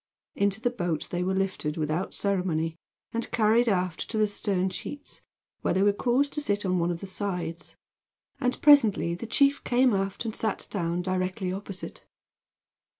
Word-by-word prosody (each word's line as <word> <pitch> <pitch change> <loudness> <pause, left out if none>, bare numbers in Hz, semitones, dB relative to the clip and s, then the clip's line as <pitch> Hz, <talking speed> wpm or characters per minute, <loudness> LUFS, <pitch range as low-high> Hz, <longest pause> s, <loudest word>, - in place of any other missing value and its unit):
Into 200 +1 +1
the 245 +1 0
boat 175 -9 -2
they 175 - -1
were 190 +1 0
lifted 190 -5 -1
without 155 +4 -1
ceremony, 180 -5 -1 0.4
and 230 0 -2
carried 225 +2 +3
aft 180 -4 -1
to 225 - -1
the 215 - +4
stern 195 -2 -1
sheets, 290 +8 -7 0.4
where - - 0
they 190 - +3
were 205 0 +4
caused 255 +6 +1
to 300 - -1
sit 205 -7 -1
on 185 -1 +1
one 170 0 +1
of 170 -1 -3
the - - -5
sides; 180 -4 -4 0.6
and 250 -2 0
presently 230 - +6
the 180 +7 -6
chief 280 +4 +3
came 250 -1 +3
aft 195 +3 -1
and 220 - -3
sat 220 -2 -1
down 175 -2 -1
directly 185 +1 -1
opposite. 195 -1 -7
195 Hz, 170 wpm, -27 LUFS, 180-225 Hz, 0.6 s, presently